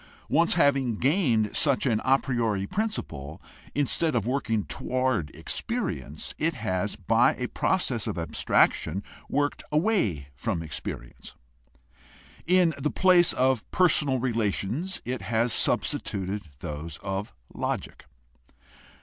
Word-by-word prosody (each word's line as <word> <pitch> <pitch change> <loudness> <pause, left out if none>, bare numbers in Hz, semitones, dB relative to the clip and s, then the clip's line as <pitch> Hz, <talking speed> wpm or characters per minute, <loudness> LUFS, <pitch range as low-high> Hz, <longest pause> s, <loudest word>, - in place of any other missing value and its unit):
Once 165 +5 +3
having 135 -7 +3
gained 125 - +1
such 140 -4 +2
an 115 -5 +2
a 135 +1 +5
priori 115 -8 -1
principle, 90 - -4 0.4
instead 145 +2 +1
of 110 -4 +1
working 120 -4 0
toward 130 -11 -1
experience; 75 +3 -4
it 165 +1 +1
has 105 -3 -2
by 90 - +3
a - - -3
process - - 0
of - - -3
abstraction 95 +6 +1 0.3
worked 145 +1 0
away 150 - +1
from 80 +6 -3
experience. 65 -6 -7 1.1
In 180 -2 +4
the 150 - 0
place 180 -1 +5
of 130 -3 +1
personal 150 -7 +3
rela 115 -4 +1
tions 140 - -3
it 125 +1 -3
has 115 0 0
substituted 100 -1 0 0.2
those 75 +1 -5
of 95 +1 -3 0.2
logic. - - -4
120 Hz, 115 wpm, -27 LUFS, 100-145 Hz, 1.1 s, a